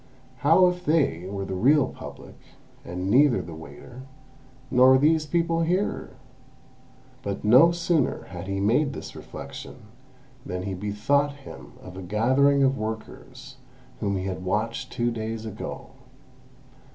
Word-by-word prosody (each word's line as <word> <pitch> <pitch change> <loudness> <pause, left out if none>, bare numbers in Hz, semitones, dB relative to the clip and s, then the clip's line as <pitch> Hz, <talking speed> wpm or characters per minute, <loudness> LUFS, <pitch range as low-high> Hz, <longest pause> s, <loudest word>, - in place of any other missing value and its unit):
How 165 +7 +5
if 180 0 0
they 140 - +1
were 100 0 -4
the 95 - -5
real 135 +9 +4
Public, - - -10 0.5
and 90 +3 -4
neither 135 0 +5
the 85 - -7
waiter, 120 +10 -11 0.7
nor 130 +1 +6
these 155 +2 +2
people 165 +1 +1
here!" 180 +5 -1 1.1
But 100 -1 -4
no 125 +10 +7
sooner 170 -4 0
had 90 -1 -9
he 95 0 -2
made 125 +8 +2
this - - -8
reflection, - - -9 0.7
than 90 0 -5
he 95 0 -3
bethought 105 +10 0
him - - -11
of 95 0 -10
a - - -6
gathering 130 +9 +3
of 135 0 +2
workers 125 +5 -7 0.4
whom 100 -2 -1
he 95 - -3
had 95 -1 -4
watched 110 +5 -2
two 120 -1 0
days 110 0 -4
ago. 105 -1 -7
120 Hz, 140 wpm, -25 LUFS, 100-145 Hz, 1.1 s, no